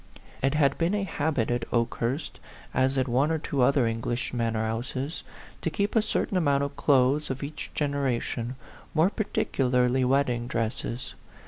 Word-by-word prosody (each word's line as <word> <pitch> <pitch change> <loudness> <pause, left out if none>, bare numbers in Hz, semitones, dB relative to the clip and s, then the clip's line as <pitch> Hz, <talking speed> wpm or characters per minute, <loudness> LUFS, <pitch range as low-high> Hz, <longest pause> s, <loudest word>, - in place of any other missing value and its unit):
It 135 +2 +2
had 140 -2 +3
been 170 +4 +2
a 205 - 0
habit 145 - 0
at 120 -1 -2
Okehurst, 120 +4 -1 0.3
as 130 +1 +2
at 130 0 +2
one 130 +5 +2
or 160 - +1
two 145 -3 -2
other 140 +2 +4
old 115 - +2
English 120 +3 -3
manor 115 -2 0
houses, 130 +7 -3 0.4
to - - 0
keep 200 +6 -1
a 225 - +6
certain 210 -2 0
amount 140 -5 +2
of 140 - -2
the - - -13
clothes 140 +2 +3
of 130 +1 -3
each 145 +2 -6
gen 145 -2 0
eration, 125 -2 -1 0.4
more 165 +5 +4
particularly 130 - +1
wedding 125 -2 +1
dresses. 115 0 -3
135 Hz, 175 wpm, -27 LUFS, 120-150 Hz, 0.4 s, a